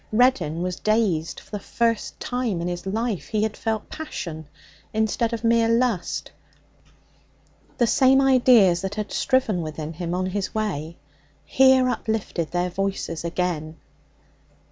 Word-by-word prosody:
Reddin 200 Hz, -9 st, +2 dB
was 180 Hz, -1 st, -3 dB
dazed. 210 Hz, -7 st, 0 dB
For -, -, -22 dB
the 205 Hz, -, -3 dB
first 230 Hz, +2 st, -1 dB
time 245 Hz, -7 st, -2 dB
in 170 Hz, -, -2 dB
his 175 Hz, +1 st, -4 dB
life 220 Hz, 0 st, -2 dB
he 215 Hz, -1 st, 0 dB
had 220 Hz, -1 st, -1 dB
felt 220 Hz, -2 st, -3 dB
passion 165 Hz, -, -6 dB, 0.5 s
instead 220 Hz, +1 st, +1 dB
of 230 Hz, -1 st, -4 dB
mere 230 Hz, 0 st, +3 dB
lust. 230 Hz, -5 st, 0 dB, 1.5 s
The 240 Hz, -, +3 dB
same 260 Hz, +3 st, +4 dB
ideas 245 Hz, -9 st, +5 dB
that 195 Hz, +1 st, -4 dB
had 210 Hz, -1 st, -4 dB
striven 230 Hz, -8 st, +1 dB
within 155 Hz, 0 st, -5 dB
him 170 Hz, +1 st, -3 dB
on 185 Hz, +1 st, -1 dB
his 190 Hz, +2 st, -3 dB
way 170 Hz, -7 st, -3 dB, 0.5 s
here 260 Hz, -1 st, +5 dB
uplifted 220 Hz, -8 st, -2 dB
their 175 Hz, 0 st, -1 dB
voices 195 Hz, -3 st, -3 dB
again. 165 Hz, -2 st, -2 dB
210 Hz, 140 wpm, -24 LUFS, 175-230 Hz, 1.5 s, ideas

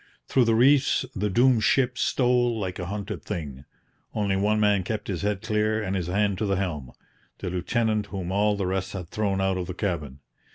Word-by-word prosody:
Through 130 Hz, -, +3 dB
the 115 Hz, -1 st, +3 dB
reefs 135 Hz, +3 st, +4 dB
the 105 Hz, +1 st, 0 dB
doomed 120 Hz, +2 st, +4 dB
ship 125 Hz, -2 st, +2 dB
stole 120 Hz, -2 st, +1 dB
like 95 Hz, -2 st, -4 dB
a 90 Hz, -, -4 dB
hunted 100 Hz, +1 st, -5 dB
thing. 75 Hz, -9 st, -6 dB, 0.5 s
Only 100 Hz, -2 st, +1 dB
one 105 Hz, +2 st, +1 dB
man 105 Hz, -2 st, +3 dB
kept 105 Hz, +2 st, -4 dB
his 90 Hz, -4 st, -2 dB
head 105 Hz, 0 st, -1 dB
clear 110 Hz, 0 st, +1 dB
and 100 Hz, -3 st, -2 dB
his 90 Hz, -3 st, -2 dB
hand 100 Hz, +1 st, 0 dB
to 105 Hz, -, 0 dB
the 100 Hz, -, +1 dB
helm 75 Hz, -10 st, -3 dB, 0.4 s
the 90 Hz, -, -5 dB
lieutenant 110 Hz, +3 st, 0 dB
whom 95 Hz, -3 st, -5 dB
all 105 Hz, +1 st, +2 dB
the 100 Hz, -, -1 dB
rest 95 Hz, +1 st, -2 dB
had 90 Hz, -4 st, -6 dB
thrown 100 Hz, -2 st, -1 dB
out 95 Hz, -1 st, +1 dB
of 90 Hz, -, -4 dB
the 90 Hz, -, -5 dB
cabin. 75 Hz, -9 st, -3 dB
100 Hz, 205 wpm, -26 LUFS, 95-110 Hz, 0.5 s, reefs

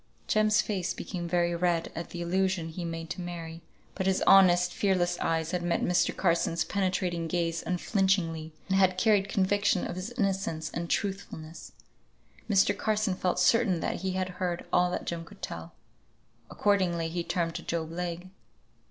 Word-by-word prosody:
Jem's 215 Hz, 0 st, +3 dB
face 185 Hz, -3 st, -2 dB
became 175 Hz, -3 st, -5 dB
very 175 Hz, 0 st, +1 dB
red 170 Hz, -1 st, 0 dB
at 170 Hz, 0 st, -5 dB
the 175 Hz, 0 st, -5 dB
allusion 185 Hz, -1 st, 0 dB
he 175 Hz, +2 st, -6 dB
made 165 Hz, 0 st, -5 dB
to 180 Hz, -, -4 dB
Mary, 165 Hz, -1 st, -6 dB, 0.3 s
but 190 Hz, -1 st, -2 dB
his 190 Hz, 0 st, +2 dB
honest, 180 Hz, -2 st, +6 dB
fearless 175 Hz, -3 st, +1 dB
eyes 165 Hz, 0 st, 0 dB
had 180 Hz, -, -1 dB
met 175 Hz, 0 st, 0 dB
Mr. 180 Hz, 0 st, +1 dB
Carson's 170 Hz, -1 st, +1 dB
penetrating 180 Hz, -3 st, -1 dB
gaze 170 Hz, 0 st, -1 dB
unflinchingly, 180 Hz, -3 st, 0 dB, 0.2 s
and 190 Hz, -, +2 dB
had 185 Hz, -1 st, +3 dB
carried 200 Hz, 0 st, +3 dB
conviction 200 Hz, -1 st, +2 dB
of -, -, -4 dB
his 185 Hz, +4 st, -4 dB
innocence 195 Hz, -7 st, -1 dB
and 170 Hz, 0 st, -4 dB
truthfulness. 190 Hz, -5 st, -4 dB, 0.8 s
Mr. 195 Hz, -2 st, +4 dB
Carson 215 Hz, -2 st, 0 dB
felt 185 Hz, -1 st, -1 dB
certain 190 Hz, -1 st, +3 dB
that -, -, -1 dB
he 190 Hz, +1 st, -2 dB
had 185 Hz, 0 st, -1 dB
heard 180 Hz, -1 st, -3 dB
all 180 Hz, 0 st, +4 dB
that 180 Hz, -, -3 dB
Jem 170 Hz, -1 st, -3 dB
could -, -, -16 dB
tell. 85 Hz, 0 st, -6 dB, 0.7 s
Accordingly 185 Hz, -5 st, +1 dB
he 170 Hz, +1 st, -3 dB
turned 170 Hz, -1 st, -1 dB
to 170 Hz, -, -5 dB
Job 165 Hz, -2 st, -3 dB
Legh. 175 Hz, +1 st, -5 dB
180 Hz, 165 wpm, -29 LUFS, 170-190 Hz, 0.8 s, honest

